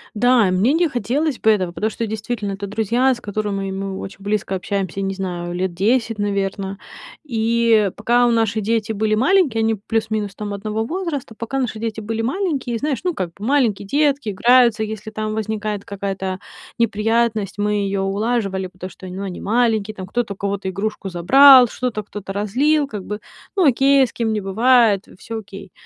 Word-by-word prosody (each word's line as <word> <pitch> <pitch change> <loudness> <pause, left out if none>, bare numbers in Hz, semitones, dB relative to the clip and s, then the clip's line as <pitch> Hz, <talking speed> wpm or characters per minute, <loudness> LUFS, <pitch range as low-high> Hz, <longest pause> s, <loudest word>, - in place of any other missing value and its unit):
Да, 245 -3 +4
мне 200 +11 +2
не 340 0 +3
хотелось 255 +5 -1
бы 220 - +4
этого, 185 -5 +1
потому 215 +5 -1
что, 230 +1 -3
действительно, 215 -1 -3
это 200 +1 -5
друзья, 230 +5 +1
с 240 - -12
которыми 205 -2 -3
мы 195 0 -4
очень 195 0 -9
близко 205 -1 -1
общаемся, 195 0 -3
не 195 0 -2
знаю, 175 -2 -4
лет 185 0 -1
10, 225 +4 +1
наверно. 195 -1 -2 0.5
И 230 -4 +2
пока 240 +3 +3
наши 225 -1 +1
дети 220 +1 0
были 215 +1 0
маленькие- 265 - +3
они 225 0 +2
плюс-минус 215 -1 -2
там 205 -1 -5
одного 215 +2 -3
возраста- 315 -7 -4
пока 230 +4 -3
наши 245 -4 -2
дети 220 -1 -4
были 225 +1 -3
маленькие, 270 - -1
знаешь, 285 +2 -1
ну, 360 - 0
как 180 - -3
бы 205 +5 -8
маленькие 225 -8 +1
детки 285 -2 +1
играются, 235 +2 +4
если 215 0 -5
там 215 0 -3
возникает 215 -1 -3
какая-то 195 -1 -4 0.4
неприятность, 225 -2 +1
мы 210 0 0
ее 195 0 -1
улаживали, 195 -1 -1
потому 185 0 -9
что, 185 - -12
ну, 185 +2 -6
они 190 -3 -5
маленькие 220 -1 +1
там. 185 -2 -7
Кто-то 220 -1 -2
у - - -22
кого-то 200 -1 -3
игрушку 200 +1 -3
забрал, 255 +9 +7
что-то 235 -2 -3
кто-то 200 -1 -8
разлил 280 +9 +1
как 210 -7 -6
бы. 210 0 -5 0.4
Ну 375 - +3
окей, 270 +1 +5
с - - -13
кем 225 -2 -1
не 210 - -2
бывает, 220 0 +3
всё 225 +2 -6
окей. 195 -3 -10
215 Hz, 180 wpm, -20 LUFS, 195-240 Hz, 0.5 s, забрал